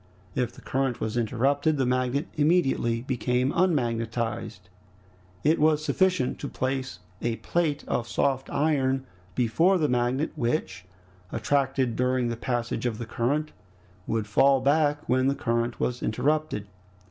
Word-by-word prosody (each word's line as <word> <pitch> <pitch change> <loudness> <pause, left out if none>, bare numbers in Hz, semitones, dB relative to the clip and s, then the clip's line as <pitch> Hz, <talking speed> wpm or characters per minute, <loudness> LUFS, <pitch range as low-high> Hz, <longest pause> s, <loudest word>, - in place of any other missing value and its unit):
If 125 +1 -1
the - - -15
current 130 -2 -1
was 110 0 -3
interrupted, 135 +6 +1
the 135 - +1
magnet 130 +4 0
immediately 140 -7 +2
became 125 0 0
unmagnetized. 115 - -1 0.8
It 155 +3 +3
was 155 0 +3
sufficient 185 -9 +1
to - - -4
place 130 0 -3 0.2
a 120 -1 0
plate 155 +2 -1
of 120 - -1
soft 135 +2 0
iron 135 -3 +1 0.3
before 145 - +3
the 155 -4 +2
magnet, 125 +4 0
which, 115 - -2 0.5
attracted 130 0 0
during 125 -1 +1
the 115 - -2
passage 120 0 -2
of 110 -3 -3
the 120 - -5
current, 140 +7 -1 0.6
would 110 -2 0
fall 135 +6 +4
back 145 +2 +2
when 130 +1 +2
the 140 - +2
current 120 -1 -1
was 125 0 -1
interrupted. 140 -1 0
130 Hz, 135 wpm, -26 LUFS, 120-145 Hz, 0.8 s, fall